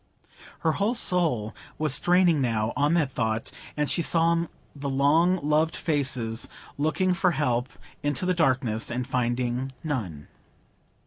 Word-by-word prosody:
Her 160 - +2
whole 205 +9 0
soul 160 - +1 0.2
was 155 -3 0
strained 175 0 +4
now 115 -3 0
on 145 +3 +2
that 150 -6 +1
thought; 110 -3 -2 0.3
and 150 0 +1
she 170 - +1
saw 165 +1 +2 0.3
the 140 0 -4
long 155 +7 +3
loved 155 +2 +2
faces 130 -7 -1 0.3
looking 170 +5 +1
for 180 -1 +1
help 125 -4 0 0.3
into 145 +4 -1
the 185 - +2
darkness, 130 -9 +1
and 125 +1 -2
finding 125 +1 -1
none. 105 - -4
145 Hz, 135 wpm, -26 LUFS, 125-165 Hz, 0.3 s, strained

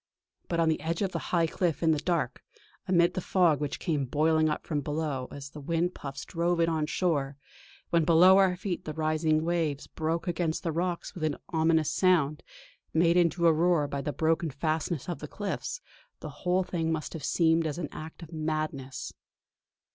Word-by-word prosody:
But 170 - -1
on 165 - +3
the 160 - +1
edge 165 +4 -1
of 190 - -1
the - - -2
high 170 -2 +3
cliff, 165 -1 -1
in 160 - +4
the 155 - +2
dark, 150 -6 -1 0.4
amid 175 -1 +4
the 185 - -2
fog 175 -5 +3
which 145 -1 -2
came 150 -6 -1
boiling 155 +3 +2
up 150 - -3
from 150 -3 -1
below 145 -3 -2
as 140 0 -9
the 150 - -9
wind 170 +4 0
puffs 140 -1 -7
drove 170 0 0
it 165 - +3
on 160 -2 0
shore; 145 -6 0 0.5
when 170 -1 +4
below 180 +4 +7
our 190 -2 +4
feet 180 -1 -4
the 155 - -5
rising 155 0 +1
waves 165 -4 -1
broke 165 +3 -3
against 170 -2 -1
the 165 - -1
rocks 175 +2 -2
with 170 - -7
an 155 -2 0
ominous 160 -1 +2
sound, 160 -4 +2 0.5
made 170 +1 +4
into 170 -1 +3
a 165 - +6
roar 165 -2 +2
by 140 0 -3
the 150 - -2
broken 160 +3 +1
fastnesses 155 +1 -2
of 175 - -4
the 150 - -6
cliffs, 210 - -4 0.4
the - - -7
whole 180 +1 0
thing 165 -3 -2
must 160 -2 -3
have 160 -4 -7
seemed 165 -1 +2
as 150 - -4
an 170 -4 -3
act 160 +2 -9
of 165 +1 -11
madness. 155 -4 -3
160 Hz, 195 wpm, -28 LUFS, 155-175 Hz, 0.5 s, below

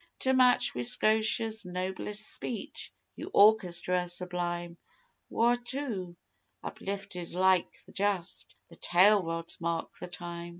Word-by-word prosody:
To 260 - +1
match 255 -1 +3
wi' 125 - -4
Scotia's 220 - +3
noblest 190 +3 -4
speech 285 +6 -6 0.2
yon - - -8
orchestra 180 -4 +3
sublime 175 -1 -3 0.5
Whaurto 240 -5 -1 0.5
uplifted 195 -3 -6
like 185 0 +2
the - - -16
Just 170 - -3
the 165 - -16
tail 195 +4 +4
rods 165 0 -3
mark 165 -1 -2
the - - -7
time. 175 -1 -8
185 Hz, 115 wpm, -29 LUFS, 175-215 Hz, 0.5 s, tail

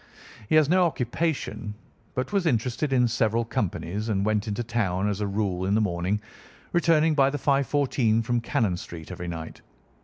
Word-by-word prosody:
He - - +3
had 155 -2 +6
no 180 +2 +4
occupation, 125 -6 -2 0.4
but 130 +10 -2
was 195 -4 +2
interested 125 +2 0
in 125 -2 +4
several 115 0 +1
companies 105 0 -2
and 100 -2 0
went 110 0 0
into 105 +3 -2
town 105 -5 0
as 105 0 -2
a 105 - 0
rule 100 -3 -1
in 100 - +2
the - - +3
morning, 95 0 0 0.5
returning 165 -2 +4
by 135 -2 +4
the 145 - -3
5:14 135 -5 +2
from 120 +1 0
Cannon 110 -5 0
Street 85 -1 -9
every 90 -1 -6
night. 80 -2 -6
115 Hz, 175 wpm, -26 LUFS, 100-135 Hz, 0.5 s, had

